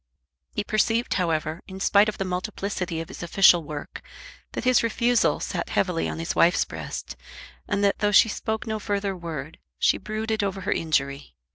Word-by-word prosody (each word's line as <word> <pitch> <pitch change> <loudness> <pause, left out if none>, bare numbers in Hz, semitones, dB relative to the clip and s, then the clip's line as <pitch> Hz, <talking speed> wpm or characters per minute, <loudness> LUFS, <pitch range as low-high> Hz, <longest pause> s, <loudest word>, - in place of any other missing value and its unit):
He 210 - 0
perceived, 225 +3 +1
however, 160 -2 -1
in 190 0 -8
spite 200 +2 +4
of 210 - -6
the 195 - -2
multiplicity 185 -2 -3
of 165 - -7
his 195 - -9
official 175 0 +5
work, 150 -1 -7 0.5
that - - -4
his 255 0 +4
refusal 235 +1 +2
sat - - -3
heavily 180 -3 0
on - - -5
his 165 +1 -2
wife's 175 +2 +4
breast, - - -6 0.5
and 205 0 0
that, 200 - +2
though 205 -1 +2
she 210 - +7
spoke 220 +1 -3
no 220 -1 -3
further 200 -2 -2
word, 160 -4 -7 0.2
she - - +3
brooded 220 +1 -2
over 195 -1 -2
her - - -2
injury. 140 - -1
195 Hz, 175 wpm, -25 LUFS, 165-215 Hz, 0.5 s, she